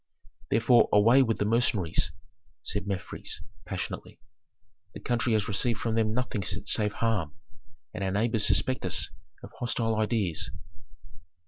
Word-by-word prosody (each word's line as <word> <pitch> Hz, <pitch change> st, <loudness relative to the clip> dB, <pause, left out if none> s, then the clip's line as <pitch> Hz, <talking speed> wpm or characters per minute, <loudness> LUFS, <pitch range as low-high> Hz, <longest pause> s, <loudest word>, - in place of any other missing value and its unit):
"Therefore 120 Hz, +1 st, +5 dB
away 115 Hz, +6 st, +6 dB
with 115 Hz, -4 st, +1 dB
the 105 Hz, -, 0 dB
mercenaries!" 100 Hz, -8 st, +1 dB, 0.5 s
said 100 Hz, -1 st, -2 dB
Mefres, 95 Hz, -2 st, -4 dB, 0.3 s
passionately. -, -, -5 dB, 0.8 s
"The -, -, -6 dB
country 120 Hz, -1 st, 0 dB
has 105 Hz, -2 st, +1 dB
received 110 Hz, +3 st, 0 dB
from 115 Hz, 0 st, -1 dB
them 110 Hz, -1 st, +2 dB
nothing 120 Hz, -3 st, -1 dB
save 105 Hz, +3 st, -1 dB
harm, 105 Hz, -9 st, -1 dB, 0.6 s
and 105 Hz, -2 st, -4 dB
our 95 Hz, -, 0 dB
neighbors 105 Hz, +2 st, +1 dB
suspect 130 Hz, 0 st, +1 dB
us 95 Hz, 0 st, -1 dB, 0.3 s
of -, -, -9 dB
hostile 115 Hz, -2 st, 0 dB
ideas." 105 Hz, -6 st, 0 dB
110 Hz, 130 wpm, -28 LUFS, 100-115 Hz, 0.8 s, away